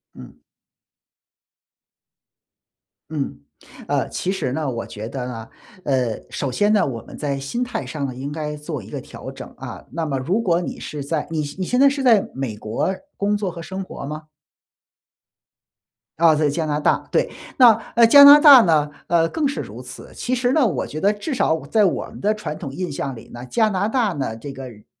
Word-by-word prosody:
嗯。 - - -12 2.7
嗯。 145 - -4 0.5
呃， - - 0
其 185 - -2
实 190 -10 -2
呢， 150 +1 -2
我 115 -2 -4
觉 105 +1 -7
得 130 -2 -5
呢， 115 -3 -7 0.4
呃， 125 -5 0
首 125 +2 -3
先 205 +11 +2
呢， 210 - +3
我 120 -5 -4
们 - - -12
在 140 -2 -2
心 140 - -3
态 245 - -4
上 140 +2 -4
呢， 130 - -4
应 135 +3 -6
该 150 -1 -4
做 150 - -6
一 - - -12
个 - - -5
调 - - -9
整 - - -10
啊。 - - -8
那 165 +3 -3
么 135 -3 -2
如 180 - 0
果 175 -6 +2
你 - - -6
是 145 -2 -6
在 150 +1 -2
你 160 - -1 0.2
你 185 - -2
现 250 - 0
在 280 +1 +7
是 275 0 -3
在 230 -6 +4
美 130 -5 -4
国 110 - -2 0.2
工 205 +1 +1
作 200 -3 -2
和 170 -1 -8
生 190 +4 -5
活 160 - -8
吗？ 150 +2 -6 1.9
啊， 165 0 +5
在 150 -1 +2
加 160 +2 -1
拿 150 -1 -1
大， - - +1
对。 - - +1 0.3
那， 245 -3 +9 0.2
呃， 230 0 +7
加 285 +5 +9
拿 285 +1 +11
大 285 -4 +10
呢， 155 -7 +2 0.2
呃， 165 -1 +3
更 305 - 0
是 280 - -4
如 - - -7
此。 - - -11
其 250 - -3
实 245 0 +1
呢， 290 -4 +4
我 195 - -1
觉 155 - -6
得 200 - +4
至 215 +9 -4
少 245 - +2
我 160 -3 -5
在 215 +8 +3
我 185 - 0
们 - - -12
的 210 +2 +2
传 210 -8 -6
统 135 - -6
印 180 +3 -4
象 135 -2 -4
里 115 - -12
呢， 120 +1 -8
加 220 - +2
拿 200 0 0
大 225 -5 +1
呢 130 -7 -3
这 140 +4 -8
个 135 -1 -8
人 105 -2 -16
160 Hz, 225 characters per minute, -21 LUFS, 135-210 Hz, 2.7 s, 拿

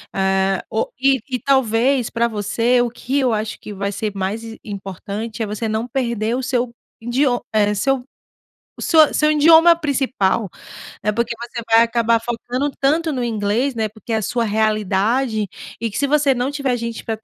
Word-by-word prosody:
Eh, 190 0 +1
o 220 - -1
e 270 -1 +3
e 255 -1 -2
talvez 255 -1 +2
pra 235 0 +1
você, 230 +3 +1
o 240 - 0
que 255 +4 -2
eu 250 -4 +2
acho 215 0 -3
que 210 - -9
vai 200 +1 -3
ser 210 +1 -3
mais 195 +4 -3
i 225 -1 -9
importante 205 +3 -5
é - - -1
você 215 +2 -3
não 220 +3 -2
perder 235 -3 -1
o 260 - -2
seu 250 -2 -1 0.3
idiom 245 +2 +1
eh, 210 -1 +3
seu 270 +4 0 0.8
o - - -7
seu 315 -3 +5
seu 305 0 +2
idioma 325 +3 +7
principal, 260 - 0 0.6
eh, 210 - +1
porque 235 +1 -1
você 235 0 -6
vai 225 +1 +7
acabar 230 0 +2
focando 245 +4 -2
tanto 310 +3 +2
no 255 -2 -2
inglês, 230 +3 0
né, 220 -1 0
porque 215 +2 -6
é 220 - 0
sua 235 +3 -1
realidade 215 +2 +1 0.3
e 230 0 -2
que 205 - -4
se 280 - +2
você 285 -1 +3
não 250 +2 -1
tiver 280 -3 -1
gente 230 -1 -5
pra 225 -1 -3
235 Hz, 185 wpm, -20 LUFS, 215-265 Hz, 0.8 s, idioma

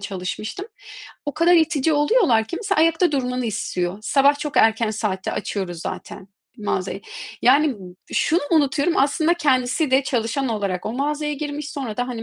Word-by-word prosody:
çalışmıştım. 205 - -5 0.6
O 290 - -3
kadar 340 +2 +4
itici 320 -2 +2
oluyorlar 295 - +3
ki 225 - -6
mesela 410 -3 -1
ayakta 330 +1 +3
durmanı 250 -2 -1
istiyor. 195 -4 -2
Sabah 280 +4 +3
çok 295 -1 -5
erken 225 0 +3
saatte 205 -3 -3
açıyoruz 180 -4 -4
zaten 190 - -7 0.3
mağazayı. 195 -3 -3 0.4
Yani, 280 +3 +4
b 180 -2 -11 0.2
şunu 330 +3 +2
unutuyorum, 300 +1 +2
aslında 310 +5 +2
kendisi 265 -1 +1
de 265 +1 +4
çalışan 250 +1 -1
olarak 200 -5 -2
o 220 - -2
mağazaya 295 +3 -2
girmiş, 295 +1 -5
sonra 260 -8 -5
da, 245 0 -2
hani, 235 -2 -5
265 Hz, 155 wpm, -22 LUFS, 220-300 Hz, 0.6 s, kadar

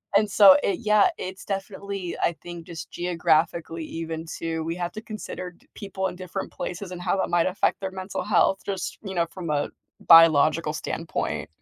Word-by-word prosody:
and 210 0 +4
so 195 -1 +8
it - - 0
yeah, 210 -2 +4
it's 185 0 -6
definitely, 195 -2 -4
I 170 - +2
think 175 -1 -9
just 170 -2 -8
geographically 165 -1 0
even 165 0 -5
too, 165 0 -4
we 165 +1 -3
have 175 -1 -3
to 215 - -6
consider 205 -5 -7
to 175 - -27
people 190 -1 -3
in - - -6
different 185 -1 -6
places 180 +1 -6
and 175 -1 -7
how 195 - 0
that - - -1
might 175 0 +2
affect 185 +1 0
their 190 -1 -4
mental 190 0 -5
health, 195 -1 +3
just, 195 -2 -4
you 195 - -5
know, 170 - +2
from 180 -4 -7
a 145 -1 0 0.3
biological 165 -3 +6
standpoint. 80 - -3
180 Hz, 185 wpm, -25 LUFS, 165-195 Hz, 0.3 s, so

